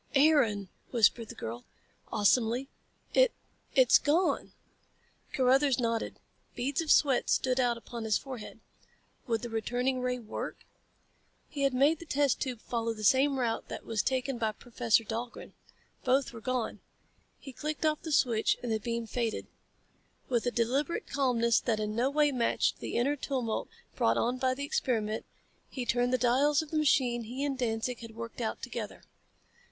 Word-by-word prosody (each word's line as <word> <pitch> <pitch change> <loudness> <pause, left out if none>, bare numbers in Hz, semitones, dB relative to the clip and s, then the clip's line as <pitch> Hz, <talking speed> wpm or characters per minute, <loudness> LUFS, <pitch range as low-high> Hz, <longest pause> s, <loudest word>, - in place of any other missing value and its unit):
"Aaron!" 265 - +4 0.2
whispered 230 -1 +3
the - - -8
girl, 120 +2 -6 0.5
awesomely. 230 +4 +2 0.5
"It... - - +5 0.4
it's - - +7
gone!" 330 +5 +1 0.8
Carruthers 270 0 +3
nodded. 230 -2 -1 0.4
Beads 270 +5 -1
of 320 - -5
sweat 275 -5 +4
stood 255 0 +2
out 240 -2 +2
upon 235 0 -7
his 215 -1 +3
forehead. 255 -5 -8 0.7
Would 230 -1 0
the 240 - -4
returning 245 +3 -1
ray 250 0 0
work? 225 -3 -6 0.8
He 285 - -5
had 275 -2 +2
made 290 +5 +4
the 340 - -11
test 285 -2 +1
tube 250 -5 -3
follow 230 -1 -2
the 215 - -8
same 270 +5 +4
route 235 -3 -1
as - - -5
that 225 -2 -1
taken 260 -1 -1
by 220 -2 0
Professor 230 0 +1
Dahlgren. 230 +3 -6 0.5
Both 260 0 +2
were 230 - -9
gone. 255 -1 -2 0.6
He 270 - -10
clicked 305 +3 -3
off 305 -1 +1
the 320 - -5
switch 235 -6 +3
and 240 - -2
the 220 - +1
beam 235 +1 -3
faded. 225 0 -2 0.8
With 245 -1 +1
a - - +2
deliberate 260 +8 0
calmness 235 -4 +2
that 225 -3 -1
in 210 0 -2
no 245 +4 +2
way 295 0 +3
matched 240 -3 +1
the - - -5
inner 275 +5 +2
tumult 255 -5 -2 0.3
brought - - +2
on 245 +2 0
by 255 0 +1
the 280 +2 -4
experiment, 220 -6 -1 0.4
he 255 -3 -4
turned 245 +1 +1
the 255 - +3
dials 275 +5 +3
of 310 - -13
the 310 - +1
machine 250 -5 +2
he 255 +5 -4
and 285 -1 -1
Danzig 240 -1 -2
had 230 -1 -10
worked 230 +1 -7
out 220 - -3
together. 235 -4 -6
245 Hz, 165 wpm, -30 LUFS, 230-275 Hz, 0.8 s, it's